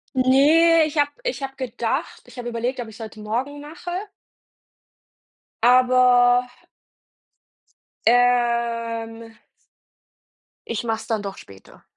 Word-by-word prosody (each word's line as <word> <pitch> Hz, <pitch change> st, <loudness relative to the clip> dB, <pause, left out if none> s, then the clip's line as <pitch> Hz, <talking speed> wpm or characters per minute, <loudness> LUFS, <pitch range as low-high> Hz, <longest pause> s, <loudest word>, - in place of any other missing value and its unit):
Ne, 305 Hz, +6 st, +5 dB
ich 305 Hz, 0 st, -6 dB
habe 290 Hz, 0 st, +2 dB
ich -, -, -3 dB
habe 270 Hz, 0 st, -6 dB
gedacht 255 Hz, +2 st, -4 dB
ich -, -, -16 dB
habe 240 Hz, -1 st, -5 dB
überlegt, 240 Hz, +2 st, -3 dB
ob 235 Hz, -, -5 dB
ich 220 Hz, -, -12 dB
es -, -, -15 dB
heute 220 Hz, 0 st, -10 dB
morgen 245 Hz, +7 st, -4 dB
mache 330 Hz, +4 st, -9 dB, 1.7 s
aber 250 Hz, 0 st, +5 dB, 1.6 s
ähm 230 Hz, -2 st, 0 dB, 1.3 s
ich 230 Hz, -1 st, -3 dB
mache 225 Hz, -1 st, -1 dB
es 220 Hz, 0 st, -11 dB
dann 220 Hz, -2 st, -1 dB
doch 195 Hz, -1 st, -6 dB
später. 95 Hz, -1 st, -16 dB
245 Hz, 115 wpm, -22 LUFS, 230-270 Hz, 1.7 s, Ne